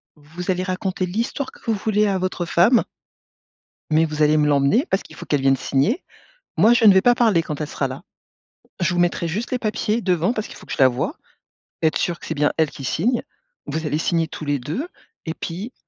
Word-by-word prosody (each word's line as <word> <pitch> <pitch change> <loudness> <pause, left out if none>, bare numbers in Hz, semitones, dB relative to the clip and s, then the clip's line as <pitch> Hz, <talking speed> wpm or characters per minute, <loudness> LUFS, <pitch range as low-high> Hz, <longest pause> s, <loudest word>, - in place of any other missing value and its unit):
vous 165 +5 -5
allez 185 0 -1
raconter 185 0 -2
l'histoire 230 +8 -3
que - - -19
vous 230 - +1
voulez 210 0 +1
à 195 - +1
votre 185 -1 -2
femme» 190 +9 +4 1.1
«mais, 160 +1 +4
vous 155 -1 -4
allez 150 +1 +4
me 150 -1 +3
l'emmener. 145 - +3
Parce 190 - 0
qu'il - - -14
faut - - -9
qu'elle 145 -2 0
vienne 135 0 +4
signer. 140 - 0 0.5
Moi, 230 - +6
je 235 -2 +3
ne 205 - +9
vais 190 - +5
pas 245 +4 +4
parler 220 -9 +3
quand 155 -2 -5
elle 150 - -2
sera 140 - -2
là. 130 +1 -8 0.8
Je 175 +1 +1
vous 175 - 0
mettrai 175 -1 +1
juste 210 +9 -3
les 255 - 0
papiers, 215 0 -1
devant, 180 +3 +1
parce 215 -2 -3
qu'il - - -11
faut - - -13
que - - -11
je - - -5
la 130 - +8
voie, 125 -1 -2 0.7
être 160 -1 +2
sûre 175 -2 -1
que - - -11
c'est 160 - -3
bien 145 0 +1
elle 160 -2 +2
qui 140 - -10
signe. 230 - 0 0.4
Vous 160 0 -3
allez 150 0 0
signer 165 0 0
tous 155 - -8
les 145 -1 0
2, 160 - -4 0.4
et 160 - -3
puis 195 +12 -6
175 Hz, 230 wpm, -22 LUFS, 150-215 Hz, 1.1 s, ne